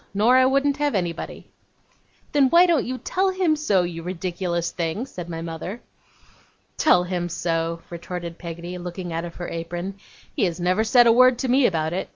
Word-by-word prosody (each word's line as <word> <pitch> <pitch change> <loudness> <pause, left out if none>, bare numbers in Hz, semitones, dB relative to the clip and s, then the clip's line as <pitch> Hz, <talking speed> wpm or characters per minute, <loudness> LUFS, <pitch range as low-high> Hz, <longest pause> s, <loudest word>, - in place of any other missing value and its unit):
Nor 225 +5 +4
I 260 0 +6
wouldn't 275 +1 +2
have 290 -4 0
anybody.' 175 -3 -3 0.9
'Then, 280 -3 +4
why 345 +4 +7
don't 335 -8 +2
you 255 +1 -3
tell 380 +8 0
him 370 -4 +1
so, 210 -12 +2
you 170 -1 -5
ridiculous 175 -1 -3
thing?' 170 +8 -3
said 180 -10 -8
my 165 -1 -5
mother. 170 +6 -6 1.0
'Tell 180 - +4
him 175 -1 -3
so,' 165 -1 -2
retorted 170 0 -6
Peggotty, 170 +1 -7
looking 175 0 -6
out 165 +1 -2
of 170 - -9
her 175 - -6
apron. 175 +3 -5 0.4
'He - - +2
has 175 -1 -3
never 185 +4 +1
said 240 +2 +5
a 230 - +6
word 255 +1 +5
to 260 - -2
me 260 +1 +5
about 160 -2 -1
it. 185 - -3
180 Hz, 190 wpm, -23 LUFS, 170-255 Hz, 1.0 s, why